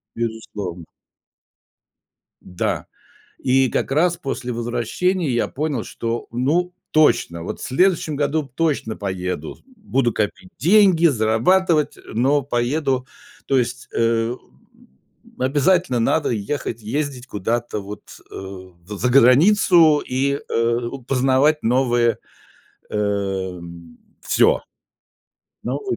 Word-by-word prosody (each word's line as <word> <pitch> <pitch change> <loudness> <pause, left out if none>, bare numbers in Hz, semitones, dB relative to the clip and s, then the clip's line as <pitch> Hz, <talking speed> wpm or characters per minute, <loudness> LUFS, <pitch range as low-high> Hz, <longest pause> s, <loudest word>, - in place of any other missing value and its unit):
Безусловно. 105 -7 -5 1.6
М-да. 90 -1 -3 0.5
И 130 0 +2
как - - -1
раз 170 +4 +2
после 130 -4 -4
возвращения 120 - -1
я 120 -1 0
понял, 145 -5 -2
что, 115 0 -4
ну, 155 +9 0 0.2
точно, 115 - +3
вот - - -6
в - - -6
следующем 165 +2 +1
году 145 +1 0
точно 145 -9 -1
поеду, 90 -5 -4 0.2
буду 135 - 0
копить 100 -3 -3
деньги, 180 - +5
зарабатывать, 150 - +2
но 135 +6 +1
поеду. 130 +1 -1 0.4
То 135 -1 +2
есть, 125 +1 -3
э, 115 +1 +1
м, - - -26 0.5
обязательно 140 +1 +2
надо 150 +7 +1
ехать, 115 +1 -3
ездить 135 +2 -3
куда-то 115 0 -2
вот, 100 +1 -9 0.3
э, - - -13
в 95 0 -9
заграницу 150 - +5
и, 140 +2 -1
э, 115 +1 +1 0.3
познавать 135 +3 +2
новые, 120 -1 +2 0.7
эм. 95 -5 -3 0.2
Всё. - - +3 1.0
Новые 130 -1 -3
125 Hz, 100 wpm, -21 LUFS, 110-150 Hz, 1.6 s, деньги